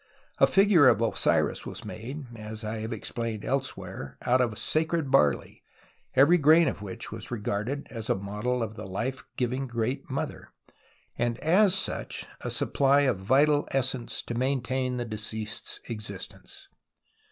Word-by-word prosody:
A - - +7
figure 195 -7 +6
of - - +5
Osiris 115 -1 +1
was - - -7
made, 135 +6 -6
as 110 0 -7
I 110 +1 -3
have 110 +2 -4
explained 115 -3 -4
elsewhere 95 - -3
(p. - - -10
01), 120 - +3
out 130 - +5
of 125 - +2
the 105 - -9
sacred 160 -2 0
barley, 75 -1 +2 0.5
every 145 +7 +6
grain 160 +2 +6
of - - -2
wliich 100 -2 -7
was - - -5
regarded 115 +4 -3
as 115 -3 -5
a - - +3
model 105 +6 -2
of 110 -1 -4
the 110 -2 -8
life 120 +8 -3
giving 130 +2 -1
Great 120 +3 -2
JNIother, 145 +3 -4 0.7
and 120 -1 0
as 185 +5 +4
such 190 - -2 0.2
a - - -2
supply 140 +1 +3
of 130 -8 +1
vital 145 +8 +3
essence 130 -2 -1
to - - -5
maintain 130 0 0
the 120 - -2
deceased's 110 -1 -5
existence. 105 -4 -8
125 Hz, 160 wpm, -28 LUFS, 110-140 Hz, 0.7 s, A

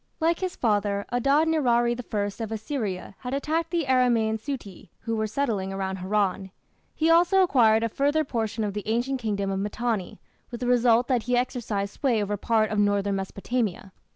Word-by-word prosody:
Like 330 +1 +1
his 370 -1 -3
father, 205 -3 0
Adad 275 +6 +3
nirari 240 -7 +2 0.2
I 205 +1 -2
of 220 - -6
Assyria 220 -5 -4
had 255 +1 -4
attacked 320 +4 -1
the 335 -3 -1
Aramaean 240 -4 +2
"Suti" 210 - -7
who 230 0 -2
were 220 0 -1
settling 215 -5 -1
about 190 0 -3
Haran. 190 0 -1 0.5
He 320 +1 +2
also 350 +3 +5
acquired 225 -9 +4
a - - +2
further 290 +6 +1
portion 225 -4 -2
of 205 -1 -2
the 210 0 -5
ancient 245 +4 -1
kingdom 200 -3 -1
of 195 - -2
Mitanni, 210 -1 -2 0.3
with 240 - -7
the 250 - -3
result 245 -1 +3
that 250 -3 +2
he 250 - +3
exercised 220 -5 -2
sway 255 -6 +1
over 205 0 -1
part 215 +1 +1
of 210 - 0
northern 205 -1 +1
Mesopotamia. 195 0 -3
225 Hz, 180 wpm, -26 LUFS, 205-260 Hz, 0.5 s, also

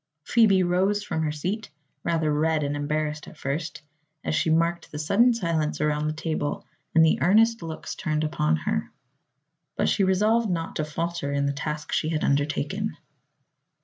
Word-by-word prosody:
Phoebe 205 -4 +4
rose 190 +4 +1
from 160 - -2
her 155 -1 0
seat, 185 +9 -3 0.3
rather 160 -3 +1
red 155 +1 +1
and 145 0 -1
embarrassed 150 +1 -2
at - - -12
first, 150 +2 -4 0.4
as - - -1
she 160 +1 +1
marked 165 +2 +1
the 150 - -6
sudden 200 +11 +4
silence 170 -9 -1
around 150 0 0
the 155 - -1
table 155 -2 -3 0.3
and 160 0 +7
the 160 - +2
earnest 225 +5 +4
looks 160 -1 -6
turned 155 -3 -1
upon 80 - +1
her. 80 - -2 0.8
But - - +1
she 200 - +2
resolved 210 +4 +2
not 165 -2 -2
to 155 - -1
falter 165 -1 -3
in 140 0 0
the 140 - 0
task 150 +2 -4
she 155 - 0
had 155 -2 -1
undertaken. 150 +8 0
160 Hz, 170 wpm, -25 LUFS, 150-185 Hz, 0.8 s, and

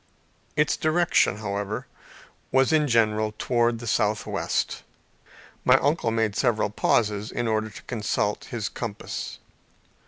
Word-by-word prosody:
Its 150 0 +2
direction, 155 - +2
however, 105 0 -3 0.7
was 135 +3 +3
in 155 -1 +3
general 110 -3 +2
towards 120 -1 +1
the 120 - -8
southwest. 105 -1 0 0.8
My 125 +1 +6
uncle 145 -3 +1
made 110 -2 0
several 115 -5 +1
pauses 105 -1 +1
in 120 - -2
order 110 0 0
to 105 - -12
consult 105 -3 -1
his 115 -4 -3
compass. 115 -4 -5
115 Hz, 120 wpm, -25 LUFS, 105-125 Hz, 0.8 s, My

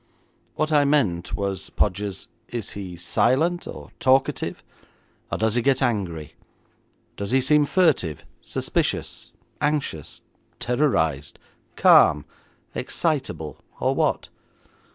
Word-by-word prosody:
'What 155 0 -1
I 145 -1 +5
meant 120 -13 +1
was, 100 -2 -3
Podgers, 100 0 -2 0.2
is 120 -2 -5
he 95 -3 -7
silent, 130 - +1
or - - -9
talkative, 130 +1 +1 0.7
or - - -1
does 110 0 +1
he 120 - +2
get 135 +1 +2
angry? 95 - -2 0.8
Does 100 -1 -4
he 130 - +3
seem 150 +3 +4
furtive, 145 - +1 0.2
suspicious, - - -2 0.3
anxious, 145 - -2 0.4
terrorised, 80 - 0 0.4
calm, 75 -2 +6 0.5
excitable, 130 - -2 0.2
or - - +1
what?' - - 0
120 Hz, 105 wpm, -24 LUFS, 90-145 Hz, 0.8 s, calm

